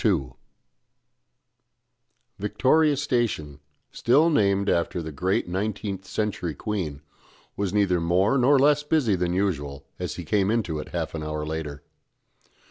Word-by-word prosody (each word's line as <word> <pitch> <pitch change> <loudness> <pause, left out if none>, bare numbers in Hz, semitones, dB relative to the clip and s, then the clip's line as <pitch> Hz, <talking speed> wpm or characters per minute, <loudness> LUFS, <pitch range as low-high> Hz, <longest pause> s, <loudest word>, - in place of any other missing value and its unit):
II 80 - +1 2.1
Victoria 130 +9 +3
Station, 120 - -1 0.3
still 150 +8 +3
named 100 -6 +2
after 85 0 +1
the 80 -1 -5
great 90 +7 0
nineteenth 95 +1 -3
century 95 -4 -2
Queen, 80 -8 -4 0.5
was 100 -2 -1
neither 95 -4 +2
more 90 +8 +2
nor 135 +3 +5
less 145 +2 +4
busy 145 -8 +2
than 90 -1 -1
usual 75 -8 -2
as - - -3
he - - -7
came 100 -2 +1
into 105 -9 0
it - - -6
half - - -3
an 80 - -4
hour 75 0 -3
later. 75 -2 -5
95 Hz, 130 wpm, -25 LUFS, 80-110 Hz, 2.1 s, nor